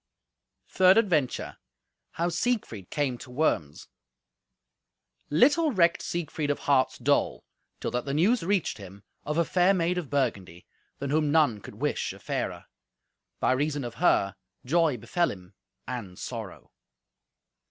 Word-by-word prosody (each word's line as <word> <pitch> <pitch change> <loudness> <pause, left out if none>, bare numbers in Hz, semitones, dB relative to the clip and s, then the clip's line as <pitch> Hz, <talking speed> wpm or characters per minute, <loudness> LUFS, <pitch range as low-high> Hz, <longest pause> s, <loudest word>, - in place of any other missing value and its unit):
Third 185 +1 +5
Adventure 165 - +1 0.6
How 170 +1 0
Siegfried 175 - -2
Came 135 -5 -1
to - - -11
Worms 125 - -1 1.4
Little 285 - +4
recked 170 -6 +3
Siegfried 155 -3 -3
of 145 - +1
heart's 130 -2 +2
dole 130 - +1 0.3
till - - -3
that 125 0 -2
the 140 - -2
news 210 +10 +3
reached 185 - 0
him 100 0 -11 0.2
of 150 +2 -2
a 170 - +3
fair 185 +3 +3
maid 180 0 +1
of 160 -7 -7
Burgundy, 100 -11 -2 0.3
than 140 0 -4
whom 150 -1 +2
none 145 -10 +3
could - - -11
wish - - -2
a - - -13
fairer; - - -4 0.7
by - - +2
reason 145 +2 0
of 120 -1 -5
her, 100 - +3 0.3
joy 160 -1 +2
befell 170 - 0
him, 90 -1 -10 0.3
and 105 -8 -6
sorrow. - - -7
145 Hz, 140 wpm, -27 LUFS, 120-175 Hz, 1.4 s, Third